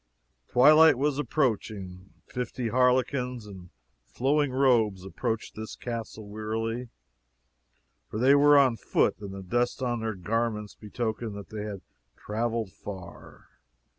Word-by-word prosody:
Twilight 155 +3 +7
was 145 +1 0
approaching. 100 -10 -2 0.2
Fifty 125 -1 -4
harlequins, 125 -1 +1
in 95 -4 -11 0.4
flowing 140 - +1
robes, 115 -8 +2
approached 115 +3 -3
this 110 0 -7
castle 115 -3 -6
wearily, 115 +3 -3 1.2
for - - -5
they 130 +5 +5
were 145 +1 +6
on 130 -4 +4
foot, - - +1
and 100 -2 -7
the 95 0 -7
dust 120 +6 0
upon 120 -2 -1
their 110 -1 -3
garments 105 +2 -2
betokened 110 0 -4
that 100 -1 -9
they 105 -1 -5
had 100 -3 -6 0.4
traveled 115 -1 -2
far. 95 -2 -10
115 Hz, 125 wpm, -27 LUFS, 105-125 Hz, 1.2 s, Twilight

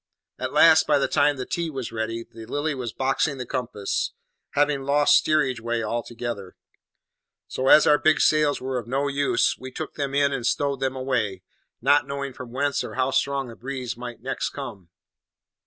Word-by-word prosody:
At - - -3
last, - - +6
by - - +4
the - - +1
time 145 -1 +2
that 130 - -6
tea 170 -1 -1
was 135 -5 -5
ready, 115 +1 -3
the 115 -1 -12
Lily 150 +2 -1
was 125 -4 -4
"boxing 135 +3 0
the 125 - -5
compass," 120 -5 -2 0.4
having 145 -1 +2
lost 145 +2 +4
steerage 135 -6 +2
way 115 0 -2
altogether; 115 -3 -4 0.9
so, 130 - -3
as 155 - +8
our 150 0 +5
big 155 -2 +3
sails 150 -1 +3
were 130 -1 -3
no 135 +3 0
use, 140 0 +1
we 130 - -7
took - - -6
them 140 -1 -3
in 140 0 +3
and 125 -3 -2
stowed 140 0 0
them 135 0 -1
away, 120 -8 -2 0.4
not 145 +2 +4
knowing 140 -1 -4
from 125 -2 -9
whence 140 +2 0
or - - -7
how 130 +1 +1
strong 140 -1 0
the 115 - -10
breeze 130 -1 -5
might 120 -1 -8
next - - -2
come. 90 -4 -8
130 Hz, 185 wpm, -24 LUFS, 120-140 Hz, 0.9 s, as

